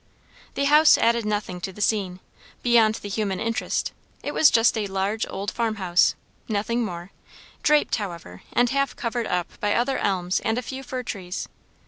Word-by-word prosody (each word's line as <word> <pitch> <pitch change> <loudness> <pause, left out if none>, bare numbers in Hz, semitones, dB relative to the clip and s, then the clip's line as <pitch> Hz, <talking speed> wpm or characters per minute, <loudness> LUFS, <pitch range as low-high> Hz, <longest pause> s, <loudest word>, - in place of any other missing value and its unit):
The 280 - 0
house 300 +2 +7
added 230 -1 +2
nothing 205 -4 -2
to 190 - -4
the 190 - -14
scene, 195 -4 0 0.4
beyond 230 -3 +4
the 205 - -7
human 200 -2 -2
interest; 230 0 -1 0.3
it - - -3
was 315 - +6
just 225 +1 +4
a 215 -2 -1
large 195 +3 -1
old 200 +2 -4
farmhouse, 205 -7 +2 0.3
nothing 230 +3 0
more; 175 -3 -6 0.5
draped, 300 -1 +3
however, 170 - -7
and 245 0 +2
half 275 0 0
covered 235 -1 -2
up 180 -1 -3
by 205 0 +1
other 255 +3 +1
elms 185 -2 0
and 225 - -1
a 250 - -2
few 265 +2 -6
fir 255 -1 -5
trees. 185 -6 -5
215 Hz, 170 wpm, -24 LUFS, 190-240 Hz, 0.5 s, house